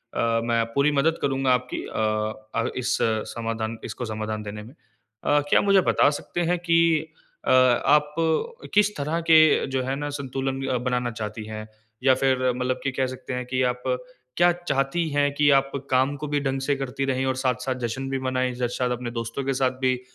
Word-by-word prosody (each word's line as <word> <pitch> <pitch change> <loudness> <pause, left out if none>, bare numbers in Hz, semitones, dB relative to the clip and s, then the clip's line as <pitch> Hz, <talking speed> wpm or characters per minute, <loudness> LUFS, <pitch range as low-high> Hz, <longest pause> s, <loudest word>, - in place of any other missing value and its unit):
अ, - - -2 0.2
मैं 115 -1 +1
पूरी 140 +2 +3
मदद 155 +3 +2
करूँगा 135 -2 +2
आपकी 125 0 -2
अ 110 0 -1 0.3
अ, - - -1
इस 125 +1 0 0.4
समाधान 115 -1 -3
इसको 120 - -5
समाधान 110 -1 -4
देने 105 +1 -7
में। 120 +6 -13 0.5
अ, 145 0 +3
क्या - - +5
मुझे 195 -1 +4
बता - - +4
सकते 150 +4 -4
हैं 180 - +2
कि 165 -2 +2 0.3
अ, - - +2
आप 130 +4 +4 0.6
किस 210 0 +3
तरह 150 +4 -1
के 155 -1 +6
जो 130 - +2
है 135 +1 -2
ना 145 +1 -4
संतुलन 135 0 -3 0.2
बनाना 125 -1 0
चाहती 110 -1 -6
हैं? 110 0 -7 0.4
या 130 -1 +6
फ़िर 130 -1 +2 0.2
मतलब 125 0 -1
कि 135 - 0
कह 130 0 0
सकते 130 0 -7
हैं 125 0 -3
कि 130 +1 -1
आप 125 0 -11 0.5
क्या 175 0 +5
चाहती 160 -1 -1
हैं 145 0 +1
कि 145 0 +4
आप 135 0 -1 0.2
काम 130 +2 +2
को 150 +1 -5
भी 145 0 0
ढंग 135 -1 -1
से 140 +1 +1
करती 135 0 -3
रहे 130 0 0
और - - -4
साथ-साथ 130 0 -1
जश्न 130 +4 -4
भी 135 - -1
मनाएँ। 130 -1 -1
ज 125 -1 -1
शायद 125 -1 0
अपने 125 -1 -3
दोस्तों 115 +3 -4
के 135 - +1
साथ 130 -1 +1
भी 130 -1 +2
130 Hz, 195 wpm, -24 LUFS, 125-145 Hz, 0.6 s, के